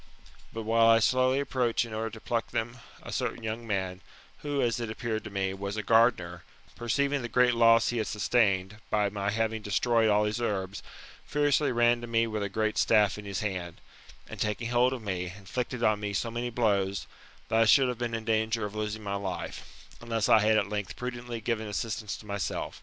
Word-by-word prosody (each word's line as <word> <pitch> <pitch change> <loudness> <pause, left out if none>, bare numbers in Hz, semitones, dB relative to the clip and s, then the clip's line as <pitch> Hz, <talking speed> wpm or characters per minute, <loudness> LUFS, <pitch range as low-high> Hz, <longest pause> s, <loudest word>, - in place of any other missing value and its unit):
But 115 - -5
while 115 +1 +4
I 115 0 +7
slowly 130 +3 +3
approach 125 -4 0
in 115 - -9
order 110 +1 -2
to 110 - -10
pluck 115 +1 -2
them, 120 +2 -3 0.3
a - - -8
certain 115 - -3
young 110 +1 -4
man, 95 -3 -2 0.4
who, 145 -1 -2
as 120 -2 +1
it 115 -2 -3
appeared 110 0 -3
to - - -5
me, 95 -1 -2
was 100 +2 -5
a 110 - -2
gardener, 100 -7 +2 0.3
perceiving 140 +4 0
the 120 - -5
great 125 +1 +4
loss 115 -1 +5
he 120 - -1
had 110 - -1
sustained, 105 -3 +1
by 105 -1 +2
my 100 0 -2
having 110 +1 -1
destroyed 115 +2 +2
all 105 0 +4
his 105 +3 -1
herbs, 100 -3 -2 0.5
furiously 145 -1 +2
ran 120 0 +3
to 120 - -6
me 115 0 +2
with 110 -2 -3
a 100 - -2
great 110 +2 -1
staff 105 -2 +3
in 105 - -9
his 100 -2 -3
hand, 90 -5 -4 0.5
and - - -9
taking 110 +2 -1
hold 125 +1 +3
of 130 -4 -5
me, 90 -3 -3
inflicted 120 +4 -4
on 110 -2 +3
me 105 -1 -3
so 115 +4 -1
many 120 +1 -3
blows, 100 -5 0 0.4
that 110 - +2
I - - +6
should 130 +4 +6
have 125 -2 -3
been 120 -1 -2
in 115 -1 -5
danger 110 0 +1
of 105 - -6
losing 110 0 -4
my 100 -1 -3
life, 100 -2 -6
unless 115 -2 -1
I 110 - +6
had 110 +1 +3
at 100 - +1
length 105 -2 -4
prudently 120 -2 -5
given 110 -1 -2
assistance 105 -1 -3
to - - -14
myself. 100 -3 -4
110 Hz, 210 wpm, -29 LUFS, 105-120 Hz, 0.5 s, I